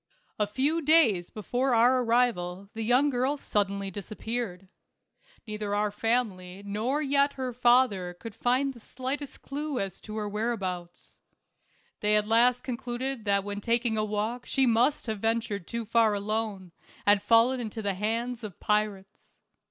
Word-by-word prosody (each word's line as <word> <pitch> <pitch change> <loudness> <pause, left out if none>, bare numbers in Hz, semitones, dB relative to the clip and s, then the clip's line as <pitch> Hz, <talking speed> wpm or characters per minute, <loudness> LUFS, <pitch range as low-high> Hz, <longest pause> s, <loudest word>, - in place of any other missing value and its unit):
A 210 - +2
few 280 +9 0
days 280 - +4
before 245 +4 -1
our 250 +3 +5
arrival 200 -6 0
the 225 - -5
young 250 +6 +3
girl 260 +3 0
suddenly 200 -5 -1
disappeared. 205 -1 -5 0.8
Neither 210 -2 -3
our 210 0 +1
family 200 -4 -1
nor 230 +9 -1
yet 280 0 +2
her 255 -2 -4
father 240 -7 +3
could 230 -2 -8
find 255 +5 +1
the 240 - -14
slightest 260 +5 -6
clue 290 -1 -3
to 215 +3 -10
her 210 -1 -2
whereabouts. 195 -5 -4 0.8
They 210 0 +2
at 210 0 +2
last 240 +2 +4
concluded 250 -1 -4
that 200 -1 +2
when 205 0 -5
taking 235 0 +1
a 215 - 0
walk 215 +4 -3
she 270 - +2
must 245 +5 +2
have 220 -3 -3
ventured 225 -4 -1
too 235 -1 -4
far 225 -1 +3
alone, 205 -3 -3 0.3
and 205 -1 +5
fallen 230 +4 +4
into 220 -2 -5
the 200 -1 0
hands 230 +4 -2
of 205 -5 -8
pirates. 210 -2 -2
225 Hz, 150 wpm, -28 LUFS, 205-250 Hz, 0.8 s, our